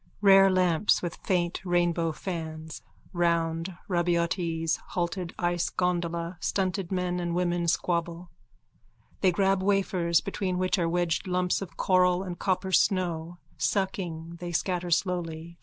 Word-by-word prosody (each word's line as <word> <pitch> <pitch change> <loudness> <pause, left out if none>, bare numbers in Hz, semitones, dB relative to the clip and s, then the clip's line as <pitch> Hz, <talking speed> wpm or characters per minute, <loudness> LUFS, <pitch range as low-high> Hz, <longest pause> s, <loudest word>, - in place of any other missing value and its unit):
Rare 195 -1 +7
lamps 185 0 +2
with 175 -2 -4
faint 175 -2 0
rainbow 175 -2 +1
fans. 160 -2 -6 0.3
Round 170 0 0
Rabaiotti's 170 -2 0
halted 175 0 -4
ice 175 -1 0
gondola 170 -1 -1
stunted 190 -2 -1
men 180 -1 -1
and 175 -1 -2
women 175 -1 0
squabble. 170 +1 -1 0.9
They 185 - +4
grab 195 +1 +2
wafers 185 -4 +2
between 190 -2 -3
which 185 +1 +1
are 170 -1 +1
wedged 175 +2 0
lumps 180 0 0
of 195 - -8
coral 180 0 +3
and 180 -2 -6
copper 190 0 -1
snow. 175 -3 +1 0.2
Sucking, 170 +1 -2
they 175 -1 -5
scatter 180 +1 -1
slowly. 170 -2 -2
175 Hz, 125 wpm, -27 LUFS, 170-185 Hz, 0.9 s, Rare